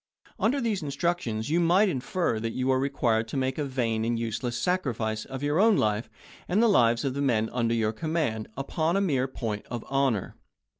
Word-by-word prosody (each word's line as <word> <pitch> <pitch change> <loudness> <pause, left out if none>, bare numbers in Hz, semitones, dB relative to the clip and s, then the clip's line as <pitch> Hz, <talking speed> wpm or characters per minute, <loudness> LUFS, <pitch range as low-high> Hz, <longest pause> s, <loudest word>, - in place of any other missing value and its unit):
Under 225 +8 +2
these 220 -6 -1
instructions 140 -5 -2
you 170 - +3
might 175 +5 +4
infer 135 - -1
that 115 +1 -3
you 130 +1 +1
are 130 - +2
required 120 -5 +1
to 125 - -4
make 130 +2 -1
a - - +1
vain 120 -5 -1
and 115 +1 0
useless 120 +1 -3
sacrifice 120 - -1
of 135 +1 -7
your 145 +3 +1
own 220 0 +5
life, 105 +1 0 0.4
and 185 +4 +1
the 235 - +5
lives 120 - +3
of 135 - 0
the 140 - -2
men 110 -5 +1
under 115 -2 +1
your 110 -1 0
command, 145 -5 -2
upon 160 +6 0
a - - +3
mere 135 -9 +1
point 110 -5 -4
of 120 -2 -5
honor. 135 -7 0
130 Hz, 200 wpm, -27 LUFS, 115-165 Hz, 0.4 s, own